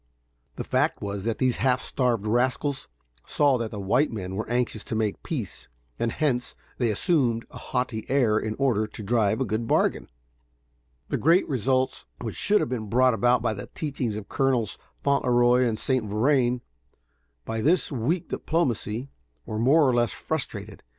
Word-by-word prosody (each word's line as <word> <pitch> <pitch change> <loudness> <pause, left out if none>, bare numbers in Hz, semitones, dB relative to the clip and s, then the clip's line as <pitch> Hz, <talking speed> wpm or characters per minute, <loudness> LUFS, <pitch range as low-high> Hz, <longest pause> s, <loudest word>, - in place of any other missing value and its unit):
The - - -4
fact - - +1
was 100 0 -4
that 115 -1 -1
these 130 -2 +1
half 130 0 +2
starved 125 -6 -1
rascals 130 +5 0 0.4
saw 140 -4 +3
that 115 -1 -2
the 105 - -6
white 125 +10 +2
men 95 -4 -5
were 110 +2 -4
anxious 120 -3 -1
to - - -4
make 110 -2 -1
peace, 125 - -5 0.3
and 115 - 0
hence 125 -4 -1 0.2
they 120 -3 +2
assumed 115 - +1
a - - -9
haughty 125 -3 -3
air 120 -6 +3
in 110 0 -3
order 120 -6 +1
to 105 - -9
drive 110 0 +1
a 130 - +1
good 110 +1 -2
bargain. - - +1 1.0
The - - 0
great 170 +5 +4
results 130 0 0
which 115 -3 -4
should 210 +1 +3
have - - -1
been 110 -4 -4
brought 130 +3 +4
about 120 +2 +2
by - - +1
the 100 -1 -7
teachings 135 -8 -2
of 105 - -7
Colonels 130 -6 0 0.3
Fauntleroy 125 -2 +3
and 115 -2 0
St. 130 0 0
Vrain, 120 +3 +2 0.8
by 115 0 -3
this 165 +8 +2
weak 145 +7 -1
diplomacy, 130 -5 -1 0.3
were 110 - -4
more 140 +5 +5
or 130 - +3
less 120 -1 +2
frustrated. 110 -9 -4
120 Hz, 170 wpm, -26 LUFS, 110-135 Hz, 1.0 s, more